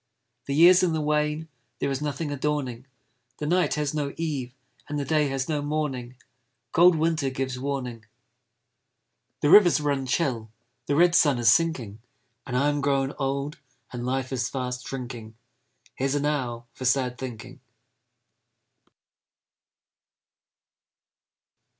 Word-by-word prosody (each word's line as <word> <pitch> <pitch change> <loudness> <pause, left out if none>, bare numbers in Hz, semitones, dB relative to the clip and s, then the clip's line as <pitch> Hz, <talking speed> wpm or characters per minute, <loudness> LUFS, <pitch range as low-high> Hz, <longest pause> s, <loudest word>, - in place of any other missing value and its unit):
The 140 - -1
year's 175 +4 +7
in 180 -3 +2
the 160 - 0
wane, 150 +1 0 0.3
There 140 - -1
is 135 +1 -2
nothing 150 +1 -3
adorning, 140 -3 -2 0.5
The 150 - -4
night 180 +4 +2
has 150 -1 -1
no 145 -2 -3
eve, 145 -7 -3 0.4
And 150 - -2
the 140 - -2
day 150 -1 +2
has 135 -1 -2
no 150 -2 -1
morning; 145 -5 -3 0.6
Cold 175 +1 +6
winter 160 -3 +1
gives 130 -1 -3
warning. 125 -5 -4 1.4
The 145 - +3
rivers 180 -6 +7
run 140 -3 -1
chill, 125 -6 -1 0.4
The 145 - +1
red 175 +2 +5
sun 145 -6 +4
is 115 -2 +5
sinking, 130 -11 -1 0.5
And 125 -1 -1
I 140 +3 +3
am 145 0 -1
grown 140 -1 +1
old, 140 +2 -2 0.3
And 120 -1 -5
life 130 +1 -2
is 125 -1 -1
fast 125 -1 -4
shrinking; 120 -4 -7 0.6
Here's 135 +2 -1
enow 135 -5 -1
for 130 - -7
sad 125 -1 +1
thinking! 125 +1 -8
140 Hz, 130 wpm, -26 LUFS, 125-150 Hz, 1.4 s, year's